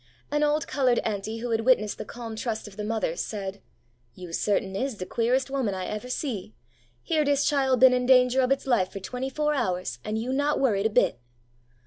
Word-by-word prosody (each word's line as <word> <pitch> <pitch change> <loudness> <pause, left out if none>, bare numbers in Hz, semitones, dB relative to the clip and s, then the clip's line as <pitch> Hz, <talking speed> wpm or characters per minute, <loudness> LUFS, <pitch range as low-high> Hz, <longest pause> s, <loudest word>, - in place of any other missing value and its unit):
An 295 0 +1
old 300 +1 +1
coloured 255 -4 +2
auntie 220 +1 -3
who 240 0 -3
had 225 0 +1
witnessed 225 -4 +2
the - - -5
calm 230 -2 -7
trust 220 -1 -3
of 200 - -12
the 210 - -5
mother 215 -6 -1
said, 200 0 -5 0.5
'You 180 -2 -9
certain 195 0 0
is 260 +3 -2
de 185 - -6
queeres' 245 +6 +1
woman 265 -8 -1
I 185 -1 -4
ever 215 +4 -5
see! 225 - -4 0.5
Here 315 -2 +1
dis 285 -1 +2
chile 270 -3 +2
been 255 +1 +7
in 250 0 0
danger 255 0 +5
ob 255 0 +1
its 275 - +1
life 215 -8 +2
for 195 - -6
twenty 250 +7 -4
four 300 +2 0
hours, 185 - -2
and 215 +1 -2
you 240 +4 -2
not 285 +2 +1
worried 220 -6 +2
a - - -4
bit 205 - +2
235 Hz, 210 wpm, -26 LUFS, 205-265 Hz, 0.5 s, been